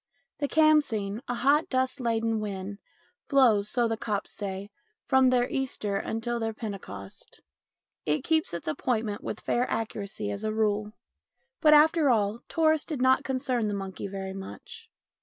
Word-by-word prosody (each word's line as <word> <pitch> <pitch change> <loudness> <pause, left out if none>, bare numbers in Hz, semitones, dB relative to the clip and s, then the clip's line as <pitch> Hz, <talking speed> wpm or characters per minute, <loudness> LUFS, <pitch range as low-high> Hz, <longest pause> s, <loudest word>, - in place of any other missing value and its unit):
The 285 - 0
khamseen, 275 -10 +2
a 245 - -2
hot 280 +6 +3
dust 260 +1 0
laden 225 -2 0
wind, 200 -1 -5 0.5
blows, 230 -8 +4
so 240 -2 +1
the 225 0 -2
Copts 210 -2 -3
say, 200 0 -5 0.3
from 265 -1 +4
their 250 -1 +3
Easter 250 -6 -2
until 230 +3 -2
their 225 -1 -2
Pentecost; 190 - -8 0.6
it 150 0 0
keeps 320 -1 +1
its 170 - -6
appointment 215 +5 -1
with 215 - -5
fair 245 +1 0
accuracy 200 - -3
as 100 - -5
a 215 - 0
rule. 210 -1 0 0.7
But, 305 -2 +7
after 310 0 +5
all, 215 -2 +2
tourists 315 -2 +2
did 300 -5 -3
not 260 +1 +4
concern 255 -4 -1
the 205 - -1
monkey 195 0 -5
very 190 -1 -5
much. 450 - -9
225 Hz, 155 wpm, -28 LUFS, 200-260 Hz, 0.7 s, But